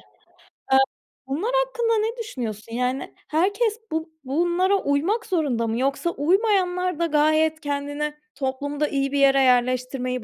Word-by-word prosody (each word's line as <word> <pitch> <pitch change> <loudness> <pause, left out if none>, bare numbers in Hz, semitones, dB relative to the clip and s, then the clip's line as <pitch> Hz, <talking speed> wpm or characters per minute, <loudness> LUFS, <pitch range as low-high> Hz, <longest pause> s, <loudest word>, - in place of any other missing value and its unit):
Eee, - - -21 1.3
bunlar 340 - -1
hakkında 470 -2 0
ne 450 +3 -1
düşünüyorsun? 230 - -5
Yani, 250 +2 -2
herkes 405 +7 +1
bu 320 +1 -2
bunlara 345 +7 +1
uymak 330 +12 0
zorunda 275 -10 0
mı, 225 +2 -1
yoksa 275 +6 0
uymayanlar 365 0 +1
da 335 - +2
gayet 310 0 +2
kendine 290 0 -3 0.2
toplumda 285 +2 -2
iyi 275 -1 -1
bir 285 - 0
yere 275 0 +5
yerleştirmeyi 255 0 +1
300 Hz, 130 wpm, -24 LUFS, 265-360 Hz, 1.3 s, yere